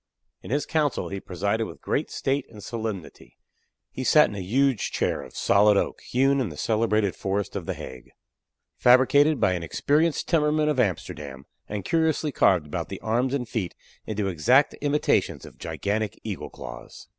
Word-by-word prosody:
In - - -10
his 145 +5 0
council 150 -4 0
he 100 - -4
presided 100 +5 -2
with 85 - -11
great - - -1
state 135 0 -1
and 105 -3 -12
solemnity. 110 -6 -6 0.5
He 130 - -5
sat 150 +4 +5
in - - -7
a - - -4
huge 130 +5 +1
chair - - -1
of - - -12
solid 105 +1 +4
oak, - - -1
hewn 135 +2 +2
in 120 - -1
the 75 - -10
celebrated 110 -2 +1
forest 100 0 -2
of - - -4
the - - -2
Hague, 65 -1 -10 0.7
fabricated 140 +4 +5
by 95 - +3
an 90 - -3
experienced 145 - +1
timmerman 150 -2 +2
of 145 -4 0
Amsterdam, 75 - -2 0.2
and 100 -3 -4
curiously 160 -2 +1
carved 90 - +3
about 75 - -4
the - - -6
arms 125 +5 0
and 125 -4 -3
feet 100 -7 -3 0.3
into 105 -2 -2
exact 110 - +3
imitations 145 +1 +1
of - - -14
gigantic 105 +1 -3
eagle's 105 -5 -5
claws. - - -10
110 Hz, 170 wpm, -25 LUFS, 95-140 Hz, 0.7 s, sat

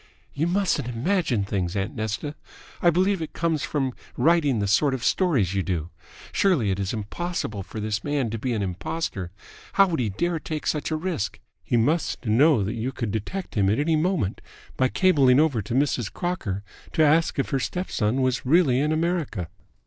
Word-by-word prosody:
"You 155 +4 0
mustn't 180 -7 +1
imagine 125 - 0
things, 95 -2 -2
aunt 100 +2 -2
Nesta. 110 +7 -3 0.5
I 175 - +5
believe 185 +2 +2
it 160 - -5
comes 165 -3 0
from 135 -4 -1 0.2
writing 155 -6 +3
the 105 - 0
sort 130 +8 +3
of 125 - -6
stories 135 - +2
you 100 - +1
do. 85 -3 -3 0.4
Surely, 155 - +2
it 95 - -2
is 95 -1 -1
impossible 110 - -3
for 105 +3 -7
this 105 0 -2
man 145 -6 -1
to 115 - -3
be 125 +2 -1
an 105 -3 -1
impostor. 95 - -3 0.4
How 195 - +6
would 170 -6 -2
he 115 -4 0
dare 170 - -1
take 155 -1 -5
such 150 - -1
a 160 - 0
risk? 165 - -3 0.2
He 120 - +1
must 145 +5 0
know 120 +2 +4
that 105 +4 -2
you 115 +3 -2
could 115 -5 -3
detect 140 - -4
him 100 -3 +2
at 105 - +2
any 155 +2 +2
moment 155 - 0 0.3
by 130 - +3
cabling 140 -6 +4
over 145 -8 +2
to 115 - -4
Mrs. 130 -5 +1
Crocker 115 - -3 0.3
to 160 - +4
ask 160 +2 +3
if 135 - -1
her 135 - +1
step 180 - -3
son 120 +4 +1
was 130 +1 0
really 140 -2 +4
in 150 +2 +1
America." 155 - -1
135 Hz, 195 wpm, -25 LUFS, 105-165 Hz, 0.5 s, How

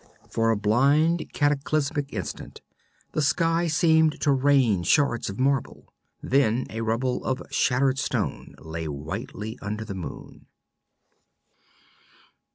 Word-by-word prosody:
For 115 0 +1
a 115 - +2
blind 140 +11 +2
cataclysmic 145 0 0
instant 95 -7 -6 0.5
the 155 - -1
sky 165 +5 +2
seemed 160 -1 +3
to 145 - +3
rain 130 -7 +3
shards 120 - +2
of 100 - -7
marble. 135 0 -1 0.3
Then 125 -3 +2
a 110 - -4
rubble 115 +3 -1
of 130 0 -2
shattered 130 +1 +2
stone - - -3
lay 80 0 -6
whitely 75 +9 -6
under 105 +1 -4
the 100 - -6
moon. 95 -3 -9
130 Hz, 115 wpm, -25 LUFS, 110-145 Hz, 0.5 s, seemed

